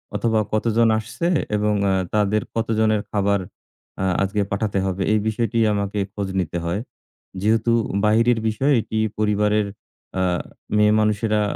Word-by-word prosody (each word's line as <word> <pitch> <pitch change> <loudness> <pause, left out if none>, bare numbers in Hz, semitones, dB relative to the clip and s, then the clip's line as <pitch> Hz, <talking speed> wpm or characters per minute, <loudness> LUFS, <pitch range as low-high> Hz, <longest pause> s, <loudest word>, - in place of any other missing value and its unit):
অথবা 110 +1 +1
কতজন 115 +1 +2
আসছে 115 +10 -3 0.3
এবং 105 0 +1 0.2
আ - - +2 0.2
তাদের 105 0 +2
কতজনের 110 -2 +1
খাবার 100 -1 +1 0.6
আ - - 0 0.2
আজকে 100 +1 0
পাঠাতে 100 -1 -1
হবে, 95 0 -2
এই 105 - +3
বিষয়টি 115 +2 -1 0.2
আমাকে 100 0 -2
খোঁজ 100 -2 -3
নিতে 85 -1 -2
হয়। 90 +6 -1 0.6
যেহেতু 110 +2 +2 0.3
বাহিরের 115 +2 +3
বিষয় 130 +7 +1
এটি 110 - -5 0.2
পরিবারের 105 0 +1 0.5
আ - - +1 0.6
মেয়ে 105 0 +4
মানুষেরা 105 0 +1
105 Hz, 135 wpm, -22 LUFS, 100-110 Hz, 0.6 s, মেয়ে